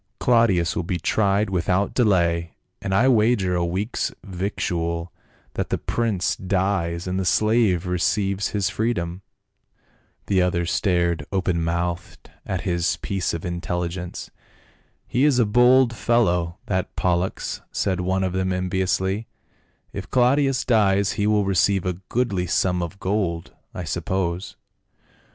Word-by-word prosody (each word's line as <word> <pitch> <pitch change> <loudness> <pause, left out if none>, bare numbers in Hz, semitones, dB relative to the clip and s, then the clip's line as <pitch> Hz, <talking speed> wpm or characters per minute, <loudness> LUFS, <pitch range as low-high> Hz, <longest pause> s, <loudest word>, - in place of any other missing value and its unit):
" - - -50
Claudius 115 -9 +3
will - - 0
be 90 +1 -2
tried 100 +3 +1
without 90 +2 0
delay, 85 -7 +1 0.3
and 95 - -3
I 115 +7 +4
wager 110 -6 +3
a 90 -1 +1
week's 95 +7 -2
victual 85 -3 -3 0.4
that - - -3
the - - 0
prince 110 -6 -1
dies 90 -3 -1
and 90 +1 -2
the - - 0
slave 105 -1 +2
receives 95 +3 0
his 100 -3 -1
freedom." 95 -6 -2 1.0
The 95 -2 +2
others 90 -1 0
stared 85 -6 +1
open 90 -3 0
mouthed 85 +1 -3 0.2
at 95 -2 -2
this 85 -4 0
piece 95 -4 -2
of 85 - -6
in 85 -1 -3
telligence. 90 0 -4 0.4
" - - -32 0.3
He 125 - +1
is 145 -4 +4
a 120 - +4
bold 125 +3 +4
fellow, 90 -9 +1
that 95 -1 -2
Pollux," 90 +1 -1
said 95 -3 -1
one 95 +1 0
of 95 -1 -1
them 95 0 0
enviously, 95 +3 -1 0.3
" - - -41
if - - -6
Claudius 135 +2 +2
dies 100 -4 +3
he 105 - -1
will 105 -1 +2
receive 95 0 +2
a 90 - 0 0.2
goodly 100 -7 0
sum 90 +1 +1
of 85 +3 -5
gold, 95 -4 -2 0.2
I 90 - -4
suppose." 85 +2 -2
95 Hz, 145 wpm, -23 LUFS, 85-105 Hz, 1.0 s, I